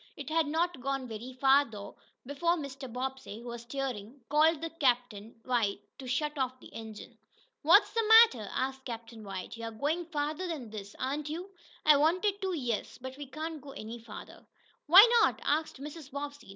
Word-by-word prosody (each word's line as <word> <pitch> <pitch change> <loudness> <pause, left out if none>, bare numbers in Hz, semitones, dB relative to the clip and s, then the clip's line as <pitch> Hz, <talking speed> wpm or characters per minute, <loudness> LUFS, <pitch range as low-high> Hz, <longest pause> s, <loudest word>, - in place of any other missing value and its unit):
It - - -7
had 320 -1 +2
not 325 -1 -1
gone 270 0 -2
very 230 +3 -7
far, 270 +2 +4
though, 205 -5 -10 0.3
before 290 +6 +1
Mr. 275 -5 -7
Bobbsey, 260 -3 -5
who 240 - -8
was 235 0 -6
steering, 245 -1 -5
called 310 +2 +3
to 330 - -3
Captain 245 -7 -1
White 230 -6 0 0.2
to 260 - -8
shut 295 +3 -1
off 255 -1 -1
the - - -15
engine. 220 -2 -9 0.4
"What's 345 +8 +5
the 455 -1 +1 0.2
matter?" 230 - -3
asked 265 0 -2
Captain 230 -2 -8
White. 195 +2 -7
"You're 230 0 -5
going 300 +9 -2
farther 305 +3 -2
than 280 -10 -5
this; 205 -2 -8
aren't 285 +3 -3
you?" 350 +5 -6 0.3
"I 300 -1 +7
wanted 370 +7 +2
to, 380 -1 -1
yes. 240 -6 -3
But 260 +1 -8
we 285 0 -8
can't 310 +3 -6
go 275 0 -10
any 225 +2 -7
farther." 225 -2 -11 0.4
"Why 380 +9 +10
not?" - - +2
asked 310 -2 0
Mrs. 295 0 -8
Bobbsey. 285 -3 -7
270 Hz, 180 wpm, -30 LUFS, 235-310 Hz, 0.4 s, Why